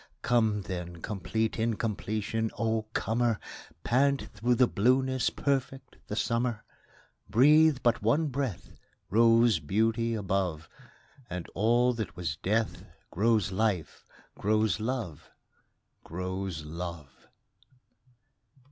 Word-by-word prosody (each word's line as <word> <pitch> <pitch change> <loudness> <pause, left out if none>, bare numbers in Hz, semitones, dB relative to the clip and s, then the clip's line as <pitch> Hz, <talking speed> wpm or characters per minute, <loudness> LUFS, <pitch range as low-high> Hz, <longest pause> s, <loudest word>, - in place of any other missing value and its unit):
Come 110 -4 +2
then, 90 -2 -6
complete 110 +3 -2
incompletion, 110 0 -1
O 110 -1 0
comer, 115 0 0 0.4
Pant 140 +3 +2
through 120 +3 +1
the 125 - +5
blueness, 130 +4 +2
perfect 135 -1 -2
the 105 - -4
summer! 115 0 -1 0.7
Breathe 150 +7 +5
but 120 -1 +2
one 145 +9 +2
breath 130 - -4 0.4
Rose 115 -2 +5
beauty 110 +8 0
above, 95 -6 -2 0.6
And 90 -1 -5
all 120 +5 +3
that 105 -8 -5
was 85 -4 -3
death 110 +5 -1 0.3
Grows 105 0 +2
life, 95 -5 -1 0.3
grows 110 0 +1
love, 110 - -4 0.7
Grows 90 -2 -4
love! 85 -2 -8
110 Hz, 100 wpm, -29 LUFS, 95-120 Hz, 0.7 s, the